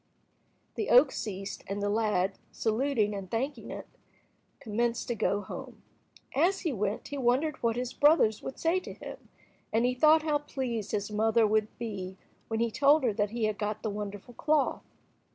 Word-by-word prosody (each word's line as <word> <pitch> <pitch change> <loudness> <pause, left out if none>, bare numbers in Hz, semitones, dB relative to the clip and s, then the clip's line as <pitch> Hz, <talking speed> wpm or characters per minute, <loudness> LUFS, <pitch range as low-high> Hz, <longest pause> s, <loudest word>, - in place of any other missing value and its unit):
'" - - -41
The 425 - -1
oak 265 +3 +7
ceased, 195 -2 -5
and 200 +1 -3
the 205 - -1
lad, 205 -3 +1
saluting 220 -2 0
and 195 -2 -6
thanking 265 +7 -3
it, - - -6 0.7
commenced 230 +2 -1
to - - +1
go 205 -1 0
home. 195 - -9 0.5
As 355 +7 +3
he 325 -6 -1
went 210 -1 -2
he 285 - -4
wondered 265 +5 +2
what 230 -1 +1
his 250 0 -3
brothers 290 -8 +4
would 265 - -6
say 335 +3 +2
to - - -9
him, - - -10 0.4
and 225 +2 +2
he 250 - +2
thought 310 +5 +5
how 300 -2 +1
pleased 245 -7 -3
his 205 0 -2
mother 220 +2 +3
would 215 0 +2
be 195 -5 -5 0.3
when 225 0 -2
he 230 0 +1
told 280 +5 +4
her 235 -4 +2
that 205 0 0
he 230 +1 -3
had 215 -1 0
got 210 0 -3
the 215 - -1
wonderful 205 +3 -6
cloth. 300 +3 +1
225 Hz, 185 wpm, -29 LUFS, 210-270 Hz, 0.7 s, oak